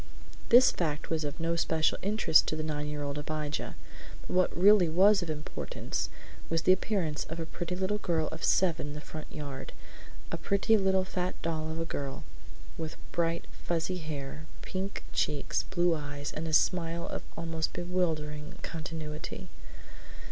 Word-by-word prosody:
This 250 +2 +8
fact 155 -3 -2
was 160 -1 +1
of 145 +1 -4
no 165 +1 +1
special 160 -1 +2
interest 200 -5 +4
to - - 0
the 155 - -2
nine 150 -1 -2
year 150 0 -3
old 140 +1 -2
Abijah, 150 0 -3 0.5
but - - -12
what 185 -1 +3
really 190 -1 +7
was 195 +5 +6
of 175 - -4
importance, 150 0 -3 0.4
was 165 -1 +1
the - - +6
appearance 185 -5 +1
of 165 +1 -6
a 165 - -2
pretty 175 +2 -4
little 190 +3 0
girl 165 -5 +1
of 160 0 -7
seven 170 -5 +3
in 145 - -5
the 150 - -5
front 155 0 -8
yard; 140 -3 -6 0.6
a - - -1
pretty 200 +3 +3
little 190 -2 +3
fat 180 -1 -2
doll 160 -1 -1
of 160 +1 -3
a 165 - -1
girl, 140 -4 -4 0.6
with 160 -1 -4
bright 170 -1 0
fuzzy 175 +2 -2
hair, 150 -1 -5 0.2
pink 195 +1 -3
cheeks, 145 -2 +1
blue 175 -2 +3
eyes, 145 -1 -4
and 160 +2 -3
a 160 - -3
smile 170 +1 +2
of - - -4 0.2
almost 165 -1 -1
bewildering 160 -4 -1
continuity. 155 -2 -5
165 Hz, 165 wpm, -31 LUFS, 150-180 Hz, 0.6 s, This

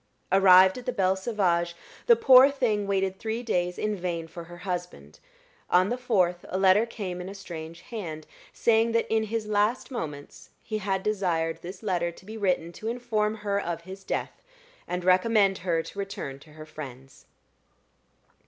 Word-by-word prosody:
Arrived 190 +2 +7
at 245 - -13
the - - +1
Belle 190 -5 +2
Sauvage, 180 -5 0 0.3
the 475 - +8
poor 265 - +7
thing 225 -7 0
waited 190 -1 0
three 225 +2 -3
days 180 -6 -1
in 215 0 -1
vain 170 -3 -3
for 170 +1 -9
her 175 +1 -11
husband: 180 -1 -5 0.5
on 185 +2 +4
the 245 - 0
fourth 185 -8 +1
a 185 - -2
letter 195 +4 +4
came 185 -6 -5
in 180 - -6
a 195 - -8
strange 165 -3 -8
hand, 165 -10 -7 0.3
saying 230 0 +2
that 230 - +2
in 220 0 +2
his 220 0 -3
last 210 +5 0
moments 150 - -7
he 215 -1 -3
had 190 -1 -1
desired 175 -6 -1
this 185 +4 -9
letter 175 -4 0
to 180 - -17
be 215 +2 -8
written 180 -5 0
to 215 +6 -8
inform 225 -3 -1
her 200 -2 -1
of 170 -2 -4
his 190 +3 -10
death, - - -4 0.5
and 180 0 -3
recommend 195 +2 +3
her 170 -2 0
to 200 - -9
return 195 -9 -5
to 150 +2 -17
her 155 0 -10
friends. 135 -4 -11
190 Hz, 175 wpm, -27 LUFS, 175-215 Hz, 0.5 s, the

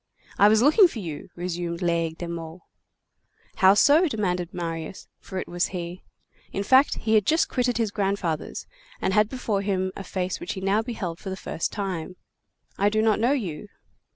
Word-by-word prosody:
"I 205 - +8
was 215 +2 +4
looking 360 - +7
for 325 - -9
you," 165 -7 -6
resumed 175 0 -4
Laigle 165 -1 0
de 175 - -5
Meaux. 165 0 -7 0.9
"How 190 -1 +6
so?" 305 - +5
demanded 180 - -2
Marius; 165 0 -5
for 190 - -8
it - - -3
was 175 +1 0
he: 175 -1 -6 0.5
in 200 - -2
fact, 260 +6 +5
he 220 - -1
had 215 -1 +5
just 320 +1 +3
quitted 245 -2 0
his 225 -3 0
grandfather's, 195 -6 -2 0.3
and 190 - 0
had 210 +1 +3
before 225 -6 -2
him 190 -2 -1
a 195 - -6
face 185 0 -3
which - - -4
he 190 - -6
now 195 +3 +2
beheld 210 -8 -5
for 195 - -7
the 190 - -4
first 165 - -3
time. 185 -4 -4 0.6
"I 200 +1 +4
do 215 +1 +1
not 220 -1 +3
know 240 +5 +3
you." 200 - -4
195 Hz, 185 wpm, -25 LUFS, 175-220 Hz, 0.9 s, I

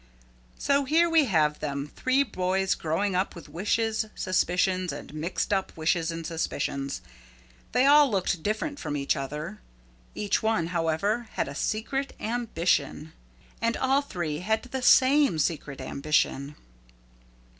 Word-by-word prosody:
So 280 0 +2
here 325 +5 +4
we 325 -3 +4
have 155 - +1
'em, 140 0 -3
three 260 +2 +2
boys 190 -4 0
growing 185 +5 -1
up 185 +2 -1
with 170 - -10
wishes, 220 +4 0
suspicions 185 0 +1
and - - -8
mixed 165 +6 -2
up 190 -3 -2
wishes 160 +1 +1
and 165 -1 -5
suspicions. 140 -4 -3 0.7
They 255 - +3
all 290 0 +7
looked 185 -4 0
different 220 - -2
from 150 -1 -3
each 140 -1 +1
other. 150 +8 -5 0.5
Each 205 -1 0
one, 220 -7 +1
however, 190 +8 0
had - - -1
a 140 - -6
secret 250 - -2
ambition. 170 -9 -1 0.5
And 230 0 +1
all 270 +2 +2
three 170 - -4
had 220 +4 0
the 260 +1 -5
same 265 - +5
secret 150 -2 -2
ambition. 140 +1 0
185 Hz, 135 wpm, -27 LUFS, 155-230 Hz, 0.7 s, all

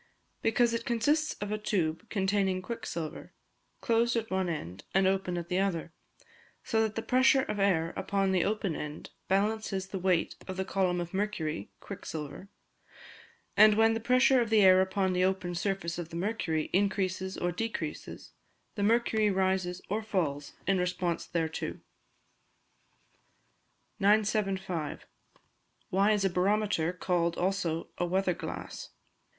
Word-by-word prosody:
_ - - -31 0.4
Because 235 +1 +3
it 230 0 -1
consists 290 +7 +1
of 205 0 -5
a 215 - -1
tube 180 -2 -1
containing 190 -2 0
quicksilver, 170 -7 -5 0.5
closed 235 0 +2
at 225 -3 -2
one 190 -1 0
end 95 - -5
and 195 0 +4
open 190 -2 +1
at 170 -1 -4
the 180 +1 0
other, 170 -4 -1 0.7
so 220 -2 +1
that 220 -1 0
the 225 - -2
pressure 260 +1 +4
of 210 - -3
air 170 -4 +2
upon 195 -1 0
the 185 -2 +2
open 205 -5 -1
end 150 0 -6 0.2
balances 200 0 0
the 190 - -4
weight 180 -2 +1
of 190 -1 -5
the 190 - -1
column 185 -2 0
of 175 +1 -5
mercury 185 - -2
(quicksilver); 150 +4 -7 1.1
and 215 +1 +7
when 225 +1 +4
the 225 - -1
pressure 255 +2 +4
of 230 - -1
the 220 -1 +5
air 185 0 +7
upon 190 0 0
the 180 0 +2
open 185 -1 0
surface 175 -1 -2
of 170 -2 -5
the 165 - -9
mercury 175 -4 -1
increases 190 -1 0
or 175 - 0
decreases, 175 -5 -5 0.4
the 205 - -4
mercury 220 0 +3
rises 190 -2 0
or 210 +3 -1
falls 160 -10 -2
in 195 0 +2
response 180 -1 -1
thereto. 160 -2 -3 2.2
975. 195 -5 +1 0.9
_Why 200 +3 +4
is 205 -2 +2
a - - +3
Barometer 190 -2 +1
called 175 -2 0
also 175 -3 -1
a 175 - +2
"Weather 185 +1 +1
Glass"? - - -7
190 Hz, 145 wpm, -30 LUFS, 175-215 Hz, 2.2 s, and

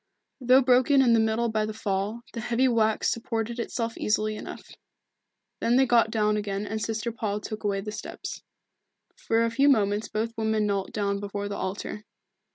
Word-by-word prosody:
Though 255 +1 +5
broken 260 +2 +5
in 240 -2 +4
the 230 - +5
middle 220 +1 +1
by 215 -1 0
the 215 - -5
fall, 205 +2 -2
the 235 - -4
heavy 240 +3 +2
wax 220 -3 +2
supported 230 0 -3
itself 230 -1 -3
easily 215 0 0
enough. - - -8 0.9
Then 235 - +2
they 265 +1 +5
got 235 -3 +4
down 210 -1 +1
again 205 -1 -3
and 220 +1 -4
Sister 225 +2 -2
Paul 215 -2 -3
took 215 +1 -7
away 200 -1 0
the 210 +1 -5
steps. - - -7 0.7
For 230 0 +1
a 230 - -1
few 275 +4 +4
moments 210 -4 +2
both 225 +2 -2
women 220 -1 0
knelt 200 -2 -1
down 200 -1 -1
before 205 0 -4
the 205 - -4
altar. 200 +2 -4
220 Hz, 180 wpm, -26 LUFS, 210-235 Hz, 0.9 s, Though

